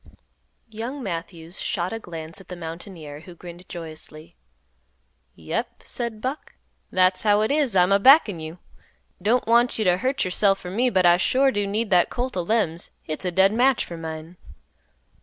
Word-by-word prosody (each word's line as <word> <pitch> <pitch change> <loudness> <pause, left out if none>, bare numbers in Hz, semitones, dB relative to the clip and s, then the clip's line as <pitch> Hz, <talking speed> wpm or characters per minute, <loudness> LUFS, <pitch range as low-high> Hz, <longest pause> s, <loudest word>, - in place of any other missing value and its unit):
Young 240 +6 -5
Matthews 170 -2 -5
shot 180 +2 -2
a 225 - -4
glance 165 -2 -8
at - - -17
the 180 - -7
mountaineer, 165 -3 -8
who 175 +2 -13
grinned 175 +1 -12
joyously. 160 -1 -10 1.0
"Yep," - - -4
said 235 -3 -5
Buck, 265 +5 -5 0.3
"that's 185 0 +3
how 210 -1 +3
it 220 - +1
is; 285 -8 +1
I'm 180 +1 +4
a 200 - +5
backin' 230 - +6
you. 160 +2 -7 0.6
Don't 235 +4 +2
want 235 +2 +3
you 215 - 0
t' 180 - +5
hurt 255 +9 0
yourself 195 +2 +2
for 180 -2 -8
me, 245 +6 +2
but 185 -5 +2
I 175 0 +6
sure 265 +9 +3
do 205 -2 -1
need 210 +2 -2
that 180 -1 +4
colt 250 +1 -3
o' 180 - 0
Lem's; 175 -4 -1
hit's 155 +4 -5
a 180 - 0
dead 190 +3 +4
match 255 +3 +3
for 170 - -8
mine." 160 +1 -7
185 Hz, 175 wpm, -24 LUFS, 170-225 Hz, 1.0 s, backin